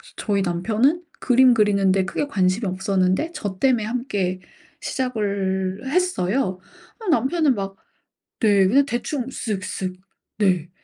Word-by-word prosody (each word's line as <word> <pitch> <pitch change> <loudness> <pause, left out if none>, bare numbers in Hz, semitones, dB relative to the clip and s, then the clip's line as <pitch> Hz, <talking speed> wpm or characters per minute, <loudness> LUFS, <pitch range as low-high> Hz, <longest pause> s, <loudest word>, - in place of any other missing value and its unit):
저희 200 -2 -1
남편은 220 - +1 0.2
그림 255 0 +5
그리는 200 -3 +3
데 190 0 +2
크게 235 +9 -2
관심이 195 -3 +1
없었는데 190 - 0
저 200 - -5
때문에 250 -5 +2
함께 205 -6 -2 0.4
시작을 200 -6 -2
했어요. 270 - 0 0.4
아 445 - -9
남편은 290 +1 +2
막 195 -1 -5 0.6
네. 205 -4 +4
그냥 275 +7 +4
대충 250 0 -3
쓱쓱. 190 -6 -4 0.4
네. 180 -5 +1
205 Hz, 250 characters per minute, -22 LUFS, 190-255 Hz, 0.6 s, 그림